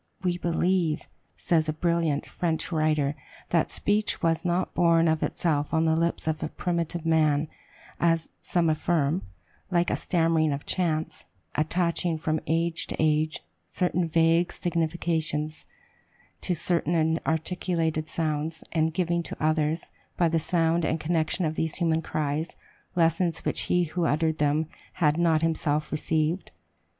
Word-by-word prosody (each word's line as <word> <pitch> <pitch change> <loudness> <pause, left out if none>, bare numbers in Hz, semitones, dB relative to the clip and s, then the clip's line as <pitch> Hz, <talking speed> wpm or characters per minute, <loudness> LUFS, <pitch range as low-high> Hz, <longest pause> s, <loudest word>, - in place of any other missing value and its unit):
"We 175 -1 0
believe," 170 -2 0 0.3
says 160 -2 +1
a - - 0
brilliant 165 -2 0
French 165 -1 -2
writer, 155 -3 +1 0.4
"that 170 -2 +2
speech 205 +1 +1
was 165 +1 +2
not 175 +1 0
born 170 -1 +4
of 160 -1 +1
itself 150 -2 0
on 160 0 +3
the 160 0 +3
lips 170 +1 0
of 155 -1 -1 0.2
primitive 170 -1 -2
man," 155 -2 +3 0.5
as 165 -1 +2
some 170 -2 +1
affirm, 155 +1 +1 0.5
"like 175 -1 +2
a - - +2
stammering 165 -3 +1
of 140 - -5
chance, 160 -4 -1 0.3
attaching, 170 +1 0
from 155 0 -1
age 165 +1 0
to - - -3
age, 155 - +1 0.2
certain 180 - 0
vague 165 +2 +3
significations 160 -2 -1 0.8
to 180 - 0
certain 170 0 0
inarticulated 160 0 0
sounds, 155 0 -2
and 160 0 +1
giving 170 -1 +1
to - - -6
others, 155 +1 0 0.3
by 170 - +4
the 165 0 +1
sound 165 +1 +1
and 160 +1 0
connection 165 +2 0
of 155 - 0
these 160 0 -2
human 165 -2 +1
cries, 155 +1 -2 0.4
lessons 165 0 +1
which - - 0
he 180 0 +3
who 170 +1 -1
uttered 160 +1 +1
them 150 +1 +2 0.3
had 155 -2 +2
not 165 -2 +3
himself 155 -2 0
received. 155 +3 0
160 Hz, 140 wpm, -27 LUFS, 155-170 Hz, 0.8 s, born